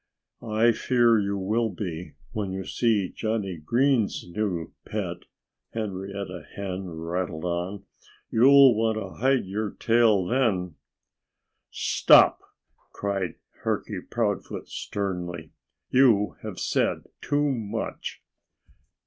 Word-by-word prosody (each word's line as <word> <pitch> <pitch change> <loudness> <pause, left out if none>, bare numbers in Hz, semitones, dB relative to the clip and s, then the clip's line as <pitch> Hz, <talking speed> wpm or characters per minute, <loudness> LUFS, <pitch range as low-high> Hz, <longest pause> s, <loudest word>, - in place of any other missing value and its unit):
"I 110 +1 +3
fear 120 -1 +3
you 100 0 -1
will 110 +4 0
be, 90 -5 -6 0.2
when 105 -4 -3
you 95 0 -4
see 110 -6 +1
Johnnie 110 -5 -2
Green's 120 - +1
new 90 -3 -3
pet," - - -4 0.5
Henrietta 100 -4 -5
Hen 95 -1 -4
rattled 85 0 -4
on. 90 +3 -3 0.5
"You'll 135 +2 +7
want 110 0 +1
to 100 0 -7
hide 135 -2 +3
your 105 +3 -2
tail 115 -5 +3
then." 100 - +1 1.0
"Stop!" - - +5 0.5
cried 95 -4 -2 0.3
Turkey - - -2
Proudfoot - - -2
sternly. 90 -5 -4 0.4
"You 115 -7 +4
have - - -6
said - - 0 0.2
too 145 0 +1
much." 110 -6 -4
100 Hz, 105 wpm, -26 LUFS, 90-115 Hz, 1.0 s, You'll